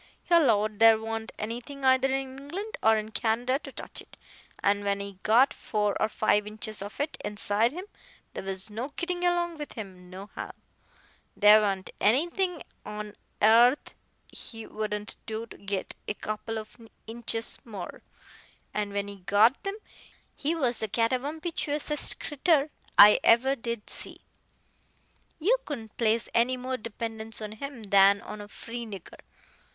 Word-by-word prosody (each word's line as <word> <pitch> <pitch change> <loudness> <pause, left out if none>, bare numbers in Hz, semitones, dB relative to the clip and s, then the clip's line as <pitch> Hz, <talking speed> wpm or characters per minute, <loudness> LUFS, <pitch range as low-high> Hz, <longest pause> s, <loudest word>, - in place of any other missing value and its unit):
He - - -2
'lowed 215 -10 +4
there 225 -1 +8
wa'n't 225 0 -4
anything 245 +6 -5
either 260 0 +5
in 265 0 -2
England 375 +10 -6
or 220 0 +5
in 215 0 -4
Canada 235 +5 0
to - - -10
touch - - -6
it. - - -17 0.5
An' 205 0 +2
when 200 0 0
he 200 -1 -7
got 240 +5 +5
four 210 -2 -1
or 215 - +2
five 210 -1 +2
inches 215 0 -3
of 205 +6 -8
it 290 +2 -2
inside 210 +2 +1
him, 360 +6 -7 0.5
there - - -5
was 195 +2 +1
no 240 +7 -4
gittin' 355 0 -2
along 345 -2 +1
with 295 - -6
him 185 -5 -9
nohow. 190 +3 -8 0.8
There 210 +1 +8
wa'n't 195 -2 -1
anything 340 - +1 0.2
on 210 0 -7 0.2
airth 235 +6 +5 0.3
he 225 -1 -7
wouldn't 210 0 -4
do 220 +1 -4
to - - -13
git 200 -1 -4
a 210 - -2
couple 215 +2 -4
of 215 -1 -8 0.3
inches 230 0 -1
more, 205 -6 -8 0.7
and 205 -1 -2
when 200 0 -1
he 200 0 -8
got 205 +7 +3
them 395 +1 -4 0.6
he 310 +4 -1
was 250 -7 0
the 220 - -1
catawamptiousest 290 - 0
critter 295 0 +1 0.3
I 210 +1 +10
ever 260 +4 +5
did 235 -3 -5
see. - - -1 1.2
You 425 +10 +3
couldn't 225 -8 -7
place 225 0 +2
any 245 +2 +3
more 255 +1 -3
dependence 225 0 -5
on 215 -1 -6
him 250 +2 -7
than 200 0 +5
on 210 - -8
a 205 - -9
free 235 +3 -7
nigger. 195 -5 -10
225 Hz, 155 wpm, -28 LUFS, 210-270 Hz, 1.2 s, I